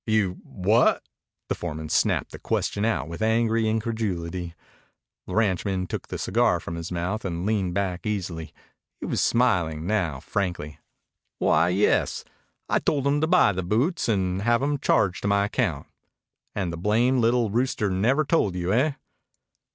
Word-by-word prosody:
"You 105 -5 +1
what?" 105 +5 +2 0.4
The - - 0
foreman 80 -2 -5
snapped - - +1
the - - -9
question 100 +1 -1
out 115 -9 0
with 85 +4 -7
angry 110 0 +2
incredulity. 95 -7 -3 0.7
The - - -5
ranchman 95 -3 +1
took - - -5
the - - -5
cigar - - +2
from 85 - -7
his 85 +1 -6
mouth 90 +5 -2
and 85 -1 -3
leaned 100 -5 0
back 100 +1 -2
easily. 90 -6 -3 0.5
He - - -5
was - - -1
smiling 85 -10 +1
now 85 -9 0
frankly. 90 -4 -3 0.6
"Why, 80 +3 +3
yes. 95 +3 +1 0.4
I - - +2
told 140 -3 0
him 145 +1 +2
to 160 - +2
buy 180 - +5
the 95 -1 -3
boots 120 - 0
and 95 -3 0
have 120 +4 +2
'em 145 0 0
charged 95 -9 +1
to - - -2
my 100 0 +3
account. 105 - -1 0.7
And 95 -4 -2
the - - -5
blamed 115 +8 +2
little 115 -2 +2
rooster 115 -3 0
never 125 +11 +2
told 120 - +1
you, 90 +2 -1
eh?" 140 +6 +2
100 Hz, 160 wpm, -25 LUFS, 90-115 Hz, 0.7 s, buy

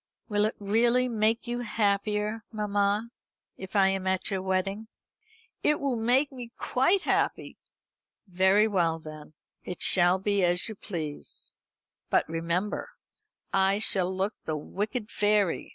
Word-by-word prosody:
"Will 205 0 +2
it 215 - -1
really 235 +5 +2
make 225 -1 +1
you 240 0 -3
happier, 210 -1 -1
mamma, 210 +1 0 0.4
if 190 +2 -10
I 195 -1 +5
am 190 -1 -2
at 190 +1 0
your 190 -1 -1
wedding?" 190 +3 -2 0.7
"It 300 - +2
will 275 -3 -1
make 250 +6 +2
me 245 -3 -9
quite 350 +10 +1
happy." - - -1 0.7
"Very 190 +3 +3
well 170 -6 +1
then; 155 -1 -11 0.3
it 180 - -4
shall 175 0 +5
be 200 0 0
as 175 0 +2
you 220 - -5
please. 160 -7 -6 0.6
But, - - +2
remember, 170 +5 -2 0.6
I 195 +1 +3
shall 190 -4 +1
look 190 +3 -1
like - - -50
the 155 -1 -2
wicked 210 - -4
fairy. 205 -4 +1
205 Hz, 140 wpm, -28 LUFS, 185-220 Hz, 0.7 s, I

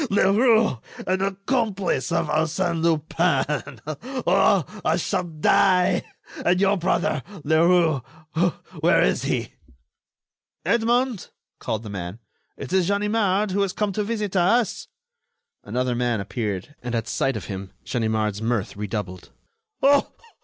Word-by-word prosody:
Leroux, 215 - +3 0.3
an 185 +1 0
accomplice 195 - -1
of - - +1
Arsène 165 +2 0
Lupin! 155 -3 0 0.5
Oh, 195 -7 +4 0.2
I 160 - +2
shall 180 - -1
die! 180 +3 +3 0.4
and 180 +1 +3
your 200 +1 +3
brother, 170 -5 0 0.2
Leroux, 160 -1 +3 0.8
where - - +4
is - - +1
he?" - - -2 1.1
"Edmond!" 235 -1 +1 0.3
called 110 0 -3
the 105 - -7
man. 90 0 -5 0.4
"It 135 - -6
is 185 -2 +3
Ganimard, 205 0 +1
who 200 +2 +1
has 195 -2 0
come 210 -1 -1
to 210 - -2
visit 210 -2 -3
us." 200 +6 +2 0.8
Another 125 0 -1
man 120 -2 0
appeared 105 +3 -4
and 120 -1 -3
at 115 -2 -2
sight 135 - 0
of - - -7
him 95 -2 -6
Ganimard's 110 -4 -1
mirth 115 -2 -1
redoubled. 100 -3 -5 0.5
"Oh! 280 +1 +4
170 Hz, 125 wpm, -24 LUFS, 120-200 Hz, 1.1 s, Oh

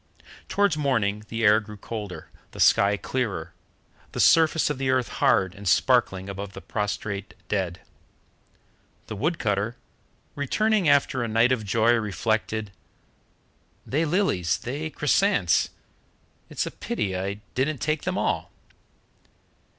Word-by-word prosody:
Towards 200 -5 +2
morning 110 -8 0
the 115 0 -3
air 105 0 +6
grew 105 -1 -10
colder, 105 -2 -7 0.2
the - - -10
sky 100 +1 +4
clearer, 100 -8 -3 0.6
the - - -4
surface 160 -2 +4
of 140 - -4
the 135 -1 0
earth 130 -2 +1
hard 95 -4 +3
and 100 0 -8
sparkling 95 -3 +2
above 100 0 -6
the - - -8
prostrate 105 -1 -4
dead. 95 -4 -2 1.2
The - - -6
wood 155 - -1
cutter, 105 +2 -1 0.6
returning 200 - +1
after 140 -2 +3
a 120 - -1
night 115 +3 +3
of 120 -4 +1
joy, 110 +3 +3
reflected: 110 -1 -1 1.1
"They 150 +5 0
lilies, 150 - +1
they 145 +6 -4
chrysants; 150 - +2 0.8
it's - - -2
a - - -5
pity 95 -2 -3
I 95 +2 -2 0.2
didn't 140 +3 0
take 155 +3 -1
them - - -2
all." - - -1
115 Hz, 130 wpm, -25 LUFS, 100-140 Hz, 1.2 s, air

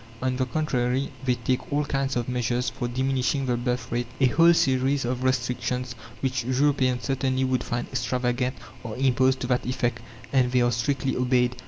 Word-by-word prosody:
On 130 0 -1
the 130 0 -1
contrary, 130 -3 0
they 125 -1 +2
take 125 +3 -2
all 145 +1 +1
kinds 135 -2 -1
of 120 -1 -1
measures 125 0 -1
for 130 -2 -3
diminishing 130 +2 0
the 125 -1 +1
birth 120 -1 -2
rate. 120 0 -1
A 135 - +5
whole 165 +7 +5
series 135 -3 +2
of 125 +1 -2
restrictions, 125 0 -1 0.3
which 130 -2 -1
Europeans 130 0 +1
certainly 130 -1 0
would 130 -1 0
find 120 0 -3
extravagant, 125 +1 -1 0.3
are 115 -3 -5
imposed 130 0 +2
to - - -1
that 125 0 +1
effect, 120 -2 -1 0.3
and 125 -2 +3
they 125 -1 +3
are 120 - +2
strictly 130 +3 0
obeyed. 125 -1 +2
125 Hz, 180 wpm, -25 LUFS, 125-130 Hz, 0.3 s, A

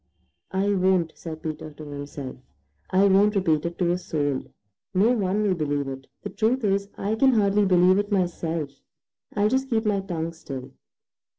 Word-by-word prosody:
"I 195 +2 +1
won't," 185 -3 +2
said 160 -2 -8
Peter 155 0 -5
to 155 - -10
himself. 145 -2 -7 0.5
"I 190 +2 +4
won't 200 +2 +4
repeat 165 -4 +2
it 170 - -7
to 175 -2 +2
a 175 - 0
soul. 145 -6 -1 0.5
No 210 +6 +4
one 210 -3 +1
will 200 -3 +2
believe 145 -4 -1
it. 135 0 -7 0.2
The - - -5
truth 235 +3 +1
is, 200 -1 +1
I 205 +2 -1
can 265 +4 +4
hardly 205 -2 +3
believe 185 +1 +5
it 205 +1 -2
myself. 170 -5 -1 0.6
I'll 205 0 +3
just 265 +4 0
keep 225 -2 +1
my 205 -2 +2
tongue 170 -4 -3
still." 135 -6 -8
185 Hz, 175 wpm, -25 LUFS, 155-205 Hz, 0.6 s, believe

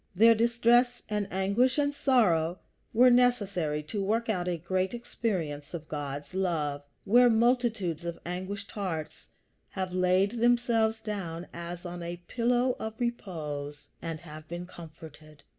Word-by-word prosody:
Their 225 +5 +7
distress 235 +2 +3
and 210 -2 -1
anguish 200 +8 +2
and 285 -1 +1
sorrow 185 - +2 0.3
were 250 +3 +6
necessary 200 -11 +2
to 200 +6 -3
work 225 +4 0
out 180 -4 0
a 175 -1 0
great 185 +5 -1
experience 175 -11 -3
of 160 -2 -7
God's 145 +1 -5
love, 160 -7 -1 0.2
where 245 +4 +6
multitudes 225 - +1
of 170 -1 -4
anguished 185 +3 -5
hearts 165 -7 -5 0.4
have 185 -2 -4
laid 185 +5 +2
themselves 235 -2 +3
down 180 -6 -4
as 170 +1 -7
on 175 0 -6
a 170 +1 -5
pillow 245 +1 +1
of 220 0 -5
repose, 150 - -4
and 165 -2 -4
have 155 -2 -10
been 175 +2 -5
comforted. 155 -3 -13
190 Hz, 140 wpm, -29 LUFS, 165-230 Hz, 0.4 s, Their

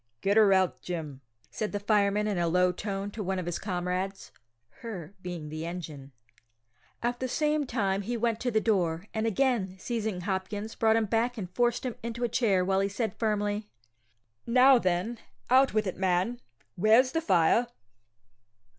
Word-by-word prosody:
"Get 200 +1 +2
her 215 -2 +6
out, 190 -2 +2
Jim," 155 -6 -5 0.3
said 215 -1 -3
the 205 - -1
fireman 205 0 +2
in 205 -4 -1
a 170 - +1
low 180 +2 +3
tone 195 +2 -4
to 215 - -6
one 190 -1 -2
of 180 - -3
his 175 -1 -3
comrades 185 0 -3 0.5
("her" 195 -7 -7
being 175 -4 -6
the 155 +1 -5
engine); 160 -5 -7 0.9
at 240 0 -1
the 255 - -2
same 300 +1 0
time 200 -5 0
he 235 +4 -3
went 230 -1 0
to 250 - -1
the 220 -2 +2
door, 180 -6 0
and 220 0 0
again 225 -5 0
seizing 220 -3 -3
Hopkins, 205 +3 -3
brought 220 -1 +3
him 225 -1 +2
back 230 +4 0
and 180 -4 -6
forced 240 +1 +1
him 250 - -2
into 235 +1 -4
a - - +3
chair, 200 -6 +2
while 190 0 +2
he 195 0 +1
said 220 +3 -2
firmly: 210 -1 -1 0.8
"Now, 255 +2 +6
then, 185 +4 -1 0.3
out 260 -2 +5
with 215 -1 +2
it, 185 - -4
man; 190 +6 0 0.3
where's 225 +7 +4
the 325 - 0
fire?" 190 - +3
205 Hz, 175 wpm, -28 LUFS, 180-230 Hz, 0.9 s, her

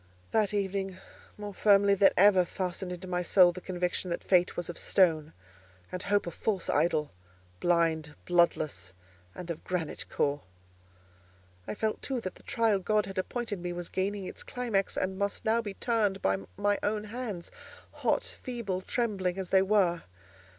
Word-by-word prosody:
That 215 -3 +2
evening 195 -2 -2 0.4
more 205 -1 -6
firmly 200 0 +5
than 195 0 +6
ever 190 -1 +6
fastened 180 +1 -4
into 180 +1 -7
my 180 -1 -1
soul 180 0 +6
the 185 - -9
conviction 180 0 -2
that 170 - -3
Fate 180 -1 +3
was 175 - -2
of 175 - -6
stone, 160 -5 +2 0.6
and 180 - -4
Hope 205 +1 +1
a 170 - -4
false 195 +1 -1
idol—blind, 150 - -1
bloodless, 155 - +1 0.4
and 175 -1 -5
of 160 - -7
granite 175 -4 -3
core. 145 0 0 1.3
I - - -3
felt, 215 0 -1
too, 265 -2 -2
that 185 -4 -5
the - - -18
trial 225 -4 +1
God 210 +2 +1
had 195 -1 -4
appointed 225 0 -3
me 175 0 -4
was 175 -1 -5
gaining 195 +1 -2
its - - -7
climax, 230 -6 -1
and 190 +1 -1
must 200 0 -2
now 225 +1 +3
be 205 -3 -6
turned 215 -5 +1
by 95 - +1 0.2
my 205 0 +1
own 210 0 0
hands, 215 -5 -6 0.4
hot, - - -1
feeble, 230 -7 -3
trembling 195 -5 -1
as 190 -2 -4
they 190 - +6
were. 190 -4 +2
185 Hz, 165 wpm, -30 LUFS, 175-205 Hz, 1.3 s, than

